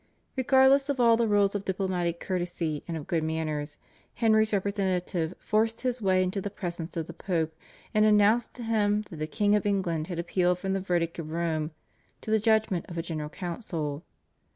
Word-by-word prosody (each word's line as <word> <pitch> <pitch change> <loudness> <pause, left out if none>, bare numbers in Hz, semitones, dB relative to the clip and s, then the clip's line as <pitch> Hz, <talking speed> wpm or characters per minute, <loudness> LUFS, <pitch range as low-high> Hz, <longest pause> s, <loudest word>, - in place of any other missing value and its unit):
Regardless 265 +1 +4
of 280 -2 -1
all 235 -1 +6
the 230 0 +1
rules 205 -1 +3
of 205 -1 -2
diplomatic 180 -3 -1
courtesy 175 -4 -2
and 165 -2 -3
of 150 - -7
good 165 -2 0
manners, 155 -2 -3 0.4
Henry's 220 -2 +3
representative 190 -4 -1
forced 225 +1 0
his 250 -1 -1
way 185 -2 +3
into 185 +2 -1
the 205 - -3
presence 175 -3 -5
of 165 - -1
the 170 - -9
Pope, 160 -3 -2 0.4
and 215 - +4
announced 215 +2 +4
to 245 - -7
him 210 -2 +1
that 165 - -7
the 155 0 -3
King 205 +6 +2
of 210 - +1
England 180 -6 0
had 175 - -5
appealed 175 +1 +1
from 190 +1 -2
the 195 - 0
verdict 175 -3 -1
of 155 -2 -5
Rome 160 -2 -1 0.5
to 215 - -5
the 220 - +4
judgment 220 -4 +2
of 170 - -7
a 165 - -1
General 155 -3 -4
Council. 165 -5 -4
185 Hz, 190 wpm, -28 LUFS, 165-215 Hz, 0.5 s, all